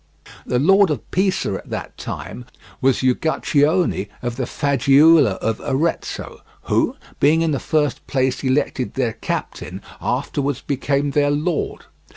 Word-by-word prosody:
The 125 - +1
Lord 195 +8 +5
of 145 -8 -4
Pisa 185 - +1
at - - -12
that - - -5
time 125 - -7 0.4
was 130 -1 +2
Uguccione 145 - +1 0.2
of 120 -1 -2
the 130 -1 -3
Faggiuola 140 -2 +4
of 110 +3 -2
Arezzo, 155 +5 -2 0.2
who - - +1 0.2
being 160 +3 +4
in 165 - +1
the 140 - 0
first 150 -4 -1
place 130 -1 0
elected 130 -1 0
their 125 -4 0
captain - - -5 0.2
afterwards 140 -2 -1
became 140 +1 -1
their 145 0 +2
lord. 150 +3 -2
140 Hz, 135 wpm, -20 LUFS, 130-155 Hz, 0.4 s, Lord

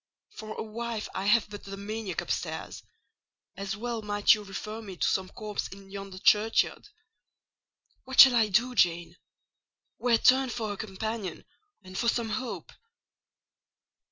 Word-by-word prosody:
For 215 0 -8
a - - -4
wife 225 0 -4
I 190 - -3
have 220 +1 +4
but 205 - -8
the 195 0 -8
maniac 205 -2 -4
upstairs: - - -4 0.7
as 200 +2 -4
well 235 0 -3
might 205 -1 +4
you 210 - -3
refer 215 +3 -6
me 195 -4 -9
to - - +1
some 190 -1 0
corpse 210 -2 -5
in 195 0 -13
yonder 195 -1 -7
churchyard. 210 +3 +2 1.2
What 260 0 -3
shall 265 -2 +9
I 225 -2 +4
do, 240 +6 +2
Jane? 175 -6 +1 0.8
Where 240 -2 +3
turn 260 +2 +4
for 220 -3 -3
a - - -9
companion 215 0 -5 0.4
and 185 0 -12
for 235 - -1
some 235 -1 +1
hope?" 230 +3 -4
215 Hz, 150 wpm, -28 LUFS, 195-230 Hz, 1.2 s, shall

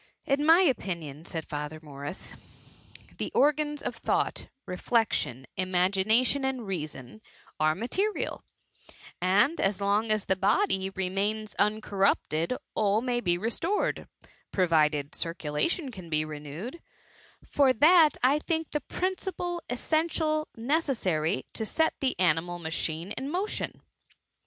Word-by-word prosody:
*^ - - -31
" - - -48
In 285 +1 +2
my 330 +3 +8
opinion,'' 170 - -1
said 160 -2 -4
Father 150 +1 -5
Morris, 145 +3 -6 0.4
" - - -20
the - - -3
organs 295 +1 +2
of - - -3
thought, - - -1 0.2
reflection, 180 - 0
imagination 190 +8 +2
and 260 -3 -1
reason, 155 - -5 0.4
are 155 0 +3
material; 385 - -1 0.8
and 205 - +3
as 195 +1 +1
long 205 +2 +1
as 215 -2 +1
the 190 - +2
body 190 - +2
remains 200 +3 -2
uncorrupted 200 -2 +1 0.2
all 210 +1 +2
may 245 -1 0
be 175 -4 +2
restored, 235 - -1 0.4
pro 185 -2 +2
vided 150 -3 +2
circulation 170 - -2
can 185 -7 -10
be 155 -1 +1
renewed: 155 - -7 0.6
for 275 -2 +4
that 310 +5 +6
I 275 +4 +4
think 320 0 -2
the 300 - -1
principle 360 -1 -3
essentially 310 +3 0
necessary 225 - 0
to - - -3
set 320 +9 +1
the 260 -8 -1
animal 175 0 +2
machine 165 +1 -3
in 270 +5 -4
motion.'' 375 +7 -3
205 Hz, 130 wpm, -28 LUFS, -, 0.8 s, my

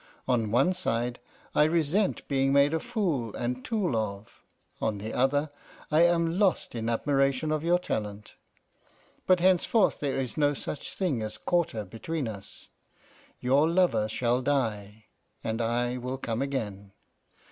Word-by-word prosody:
On 115 -4 +1
one 135 - +3
side, 125 -9 -2 0.3
I - - +5
resent 170 +5 +1
being 135 -1 +1
made 140 +2 +4
a 160 - +1
fool 155 - -2
and 125 +1 -3
tool 200 - -1
of; 105 -1 -4 0.4
on 110 -2 0
the 110 +3 -6
other, 145 +3 +1 0.4
I 155 +2 +5
am 170 +1 +2
lost 200 -4 +1
in 115 -1 -2
admiration 135 +4 +1
of 155 0 -1
your 175 +1 +4
talent. 105 - -4 0.9
But 185 -2 +4
henceforth 190 +4 +3
there 140 -2 -1
is 130 +1 -4
no 145 -1 +3
such 145 - -6
thing 160 - 0
as 110 0 -5
quarter 165 - 0
between 130 - -4
us. 100 -3 -8 0.7
Your 140 +5 +3
lover 170 -11 +2
shall 120 +3 +1
die, 110 -6 -2 0.4
and 115 +1 -2
I 120 +2 0
will 125 +1 -4
come 115 -2 -3
again. 105 -8 -4
135 Hz, 145 wpm, -28 LUFS, 115-160 Hz, 0.9 s, I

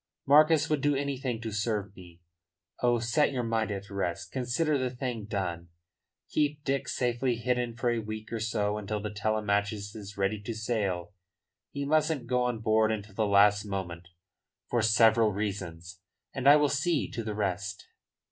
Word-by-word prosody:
Marcus 155 +2 +5
would 150 -3 0
do 145 0 +2
anything 135 -4 -2
to 115 -2 -4
serve 105 -2 -2
me. 90 -2 -14 0.6
Oh, 120 -1 +3
set 120 +7 +2
your 125 -3 -2
mind 115 -1 0
at 100 0 -5
rest. 95 -1 -3
Consider 130 +5 0
the 130 -2 0
thing 125 -3 -4
done. 90 -5 -3 0.6
Keep 150 -1 0
Dick 135 -1 -1
safely 125 0 0
hidden 120 0 -1
for 120 +1 0
a 120 - 0
week 110 +1 -6
or 115 - -1
so 105 -1 -1
until 105 +1 -3
the 105 0 -4
Telemachus 105 -1 -1
is 100 -1 -9
ready 100 +2 0
to 110 +2 -5
sail 105 -5 -2 0.6
he 140 0 -4
mustn't 155 -2 +1
go 125 +1 +1
on 120 -3 -2
board 110 -1 +3
until 105 -2 -5
the 110 +1 0
last 100 0 +5
moment, 90 -4 -5 0.6
for 120 - +1
several 110 0 +5
reasons 90 -4 -5 0.3
and 135 +1 +3
I 145 - +9
will 150 -1 +4
see 145 +3 0
to 115 - -4
the 105 -1 -4
rest." 100 0 -3
110 Hz, 170 wpm, -29 LUFS, 100-125 Hz, 0.6 s, I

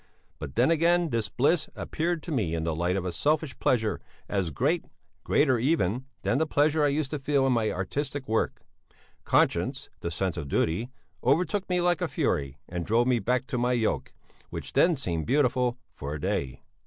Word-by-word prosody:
But 65 - -7
then - - +4
again 170 0 +3
this 115 -3 0
bliss 150 - +2
appeared 165 0 -2
to 175 - -6
me 100 - 0
in 80 - -2
the 80 0 -1
light 85 +3 0
of 95 -2 -2
a 90 - -1
selfish 150 - 0
pleasure 110 -4 +1 0.3
as 95 -4 -1
great, 145 - 0 0.4
greater 130 -5 +3
even, 125 - +1 0.2
than 130 - +1
the 160 - +1
pleasure 150 +1 +2
I - - +5
used 145 -1 -1
to 150 - -2
feel 140 0 +2
in 130 - +3
my 110 -2 +1
artistic 135 +9 -3
work; 110 0 -1 0.6
conscience, - - +1
the 85 - -3
sense 90 +1 -2
of 75 -4 -4
duty, 85 - 0 0.3
overtook 180 +9 +1
me 180 -1 +2
like 175 -1 +2
a - - +1
fury 70 -1 -1
and 90 0 -4
drove 115 +6 +2
me 125 -2 +2
back 125 +2 0
to 130 -3 -3
my 125 +1 +2
yoke, 115 -3 0 0.4
which - - -6
then 170 -1 +4
seemed 85 - -2
beautiful 125 -3 +2 0.2
for 70 +2 -5
a - - -5
day. 65 -2 -2
125 Hz, 190 wpm, -27 LUFS, 95-150 Hz, 0.6 s, I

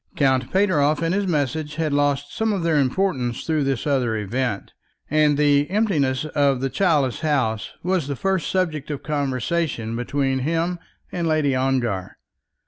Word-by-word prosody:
Count 130 -2 +1
Pateroff 165 -6 +2
and 165 +1 +1
his 200 0 0
message 150 -1 -1
had 155 -2 -1
lost 145 0 0
some 220 0 0
of 195 -4 -1
their 160 -3 +2
importance 130 -4 0
through 155 -3 +1
this 135 -3 -1
other 130 -6 +1
event, 110 +1 -3 0.4
and 150 -1 +3
the 145 0 +3
emptiness 155 -10 +1
of 145 -3 +1
the 135 0 -2
childless 150 -10 +1
house 135 -9 -1
was 180 -4 0
the 140 - -2
first 190 +1 -1
subject 160 -6 -1
of 145 -2 -4
conversation 140 -4 -1
between 135 +2 -1
him 165 +5 -1 0.3
and 170 -2 -2
Lady 155 -3 +2
Ongar. 120 -8 -1
145 Hz, 155 wpm, -22 LUFS, 130-165 Hz, 0.4 s, and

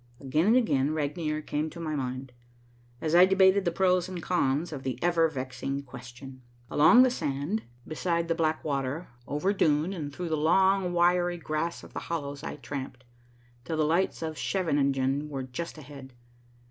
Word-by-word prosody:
Again 150 +6 0
and 225 - +5
again 155 - +2
Regnier 155 0 -2
came 150 +2 -2
to 170 - -11
my 155 -2 -3
mind, 130 -1 -4 0.7
as 155 0 -1
I 180 +2 +8
debated 190 0 +4
the 170 - +2
pros 180 0 +2
and 185 -2 -5
cons 160 -2 0
of 140 - -6
the 130 -2 -3
ever 170 -2 +3
vexing 135 0 -4
question. 130 +1 -11 0.3
Along 240 +12 +7
the 255 - +3
sand, 155 - -2 0.3
beside 170 +1 -1
the 165 - +1
black 160 -1 0
water, 140 +3 -2 0.2
over 165 +8 0
dune, 155 0 +2
and 150 -6 -5
through 175 +4 -5
the 160 - +1
long 190 +4 +3
wiry 175 0 +2
grass 165 +1 -3
of - - -13
the - - -3
hollows 145 -4 -4
I - - -5
tramped, 135 -3 -7 0.6
till 160 +3 -3
the 155 - +2
lights 170 +2 0
of 160 -1 -4
Scheveningen 140 -5 0
were 135 -2 -4
just 130 +7 -6
ahead. 140 -3 -11
155 Hz, 170 wpm, -28 LUFS, 140-175 Hz, 0.7 s, I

